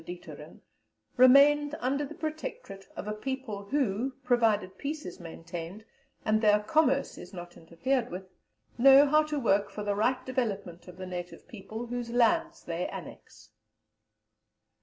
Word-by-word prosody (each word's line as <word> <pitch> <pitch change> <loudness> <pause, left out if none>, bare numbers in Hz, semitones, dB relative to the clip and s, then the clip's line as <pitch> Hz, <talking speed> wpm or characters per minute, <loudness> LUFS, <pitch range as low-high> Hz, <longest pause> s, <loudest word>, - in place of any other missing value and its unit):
Dieterlen, 175 0 -10 0.5
"remained 285 +3 +6
under 275 +3 0
the 295 +2 -7
Protectorate 310 - -6
of - - -6
a 210 - -2
people 220 -3 -5
who, 255 0 -1
provided 220 -7 +1
peace 300 +2 -4
is 180 - -8
maintained, 170 +4 -8 0.4
and 215 0 +2
their 210 -1 +5
commerce 275 +3 +1
is - - -11
not 175 0 -9
interfered 235 +10 -2
with, 185 +1 -7 0.5
know 270 +3 +8
how 305 +2 +4
to 305 -1 -3
work 205 -5 +2
for 210 - -6
the 205 0 0
right 250 +5 0
development 200 -9 -3
of 180 -1 -12
the 185 - -6
native 175 -1 -7
people 220 +1 -7
whose 240 0 -4
lands 330 +8 +1
they 170 +1 -3
annex." - - -11
230 Hz, 145 wpm, -29 LUFS, 195-275 Hz, 0.5 s, know